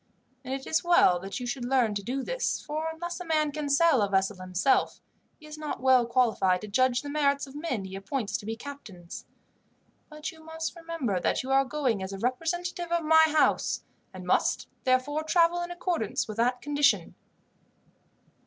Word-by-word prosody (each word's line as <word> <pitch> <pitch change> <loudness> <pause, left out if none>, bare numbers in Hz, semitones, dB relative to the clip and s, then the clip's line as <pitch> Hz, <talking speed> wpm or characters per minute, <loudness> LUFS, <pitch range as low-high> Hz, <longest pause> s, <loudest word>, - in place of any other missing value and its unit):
And 260 - -7
it 270 0 -4
is 315 - +1
well 345 - +5
that 195 +5 -6
you 250 - -5
should 245 +1 -4
learn 245 -3 +2
to 205 - -3
do 260 +6 -3
this, - - -1
for 310 +2 -3
unless 345 +2 -6
a - - -5
man 310 -3 +1
can 295 -1 -4
sail 280 -3 +4
a 200 - +1
vessel 195 0 +1
himself, 185 +7 +1 0.4
he 310 - -15
is 305 0 -9
not 305 -1 -4
well 255 -2 +4
qualified 225 -7 +2
to 215 - -7
judge 255 +4 +2
of 250 - -1
the 290 - -6
merits 280 -2 +1
of 270 - -13
men 290 - -3
he 190 0 -8
appoints 205 +3 -3
to 205 - -10
be 225 - -2
captains; 220 -10 -10 0.8
but 305 0 -6
you 320 -1 -16
must 320 +1 -5
remember 330 - -2
that - - 0
you 265 - -4
are 270 0 +4
going 260 -7 -1
as 190 +1 -5
a - - -5
representative 335 - -2
of 340 -1 +1
my 320 0 +7
house, 310 0 +1 0.3
and - - -9
must, - - +1 0.2
therefore, 255 +4 +1
travel 340 +2 +2
in 345 - -4
accordance 350 - -2
with 215 -1 -7
that 245 +2 +1
condition. 290 -1 +2
275 Hz, 195 wpm, -28 LUFS, 230-320 Hz, 0.8 s, my